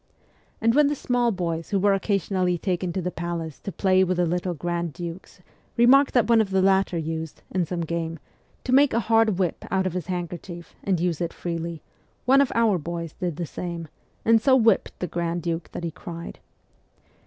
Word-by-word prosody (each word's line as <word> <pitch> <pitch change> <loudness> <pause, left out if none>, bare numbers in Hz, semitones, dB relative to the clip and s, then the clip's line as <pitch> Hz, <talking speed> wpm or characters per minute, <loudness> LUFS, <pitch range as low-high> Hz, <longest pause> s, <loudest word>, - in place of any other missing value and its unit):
And 230 +1 +3
when 295 +2 +5
the 295 - 0
small 245 -3 +1
boys 170 -4 -3
who 200 - +1
were 200 +1 +3
occasionally 190 -2 0
taken 180 0 -2
to 185 - -2
the 180 - -2
palace 165 -3 -4
to 195 - -6
play 190 0 +3
with 185 -1 0
the 180 - +3
little 175 +1 -1
grand 170 0 -3
dukes 175 +1 -8 0.4
remarked 265 +4 +5
that 235 -4 +4
one 230 -1 +5
of 210 - -1
the 190 -1 +2
latter 190 -2 +3
used, 160 -1 -4
in 180 -3 0
some 175 +1 -3
game, 165 0 -3 0.5
to 255 - -3
make 275 -2 +5
a - - +3
hard 225 -2 +3
whip 180 -4 -1
out 190 0 +1
of 185 - -1
his 180 -3 -4
handkerchief, 175 -1 -6
and 190 -4 +1
use 175 -2 -1
it 170 - -2
freely, 170 -1 -4 0.4
one 270 +2 +6
of 280 - +1
our 225 -5 +3
boys 170 0 -5
did 175 -4 -3
the 170 - -3
same, 170 0 -6 0.4
and 225 0 +5
so 265 +2 +5
whipped 225 -5 +3
the - - -3
grand 170 0 -2
duke 165 -1 -3
that - - -6
he 170 - -2
cried. 170 +1 -8
180 Hz, 200 wpm, -25 LUFS, 170-205 Hz, 0.5 s, one